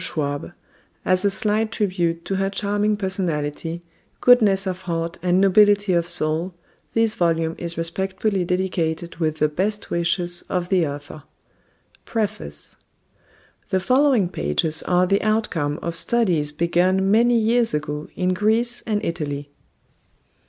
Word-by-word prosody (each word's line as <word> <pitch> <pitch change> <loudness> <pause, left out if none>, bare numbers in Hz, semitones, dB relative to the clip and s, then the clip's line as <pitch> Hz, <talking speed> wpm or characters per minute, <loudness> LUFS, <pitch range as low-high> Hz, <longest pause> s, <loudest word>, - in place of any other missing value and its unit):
SCHWAB 145 +2 0 0.5
AS 185 +2 +2
A - - +5
SLIGHT 215 +2 0
TRIBUTE 175 -6 -1
TO 195 - -2
HER 195 0 0
CHARMING 205 +1 0
PERSONALITY 170 -4 -2 0.4
GOODNESS 210 -6 +5
OF 185 -1 -3
HEART 165 -2 -3
AND 180 0 +2
NOBILITY 205 0 +4
OF 170 0 +1
SOUL 170 +2 -1 0.4
THIS 225 -1 +2
VOLUME 165 -2 0
IS 170 -1 -4
RESPECTFULLY 190 +3 -1
DEDICATED 175 -2 -2
WITH 155 -2 0
THE 155 -1 +2
BEST 200 +7 -2
WISHES 175 0 0
OF 180 -1 -2
THE 180 -5 +2
AUTHOR. 145 +1 -7 0.8
PREFACE 75 - -3 0.9
The 190 - +1
following 255 -1 +3
pages 155 - -1
are 180 0 +2
the 195 +2 +1
outcome 200 -9 0
of 170 -1 -3
studies 170 -7 +1
begun 180 +4 +1
many 235 +2 +4
years 230 -3 +2
ago 150 0 -4
in 185 0 0
Greece 225 +5 +1
and 210 -2 -1
Italy. 145 -3 -4
180 Hz, 130 wpm, -22 LUFS, 165-205 Hz, 0.9 s, A